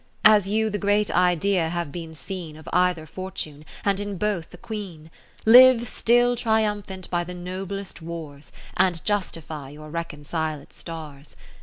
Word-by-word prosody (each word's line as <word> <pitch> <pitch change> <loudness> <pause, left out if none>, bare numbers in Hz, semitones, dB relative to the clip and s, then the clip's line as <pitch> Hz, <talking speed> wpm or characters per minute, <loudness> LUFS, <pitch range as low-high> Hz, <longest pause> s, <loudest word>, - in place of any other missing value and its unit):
As 210 -3 +7
you 220 +1 +1
the 205 - -2
great 205 0 +2
Idea 180 -1 +2
have 170 -3 -3
been 165 -1 -7
seen 165 -1 -7
Of 155 - -14
either 180 -3 +2
fortune, 155 -4 -5 0.2
and 200 -1 +2
in 205 -1 -4
both 200 -4 -1
a 180 - -11
Queen, 180 -7 -7 0.3
Live 245 +1 +8
still 245 +2 +3
triumphant 210 -5 -1
by 175 -1 +1
the 180 +1 -7
noblest 185 +1 -6
wars, 160 -3 -8 0.2
And 180 -4 +2
justify 165 -8 -2
your 150 +1 -11
reconciled 155 -2 -4
stars. 155 -4 -9
180 Hz, 145 wpm, -24 LUFS, 160-205 Hz, 0.3 s, Live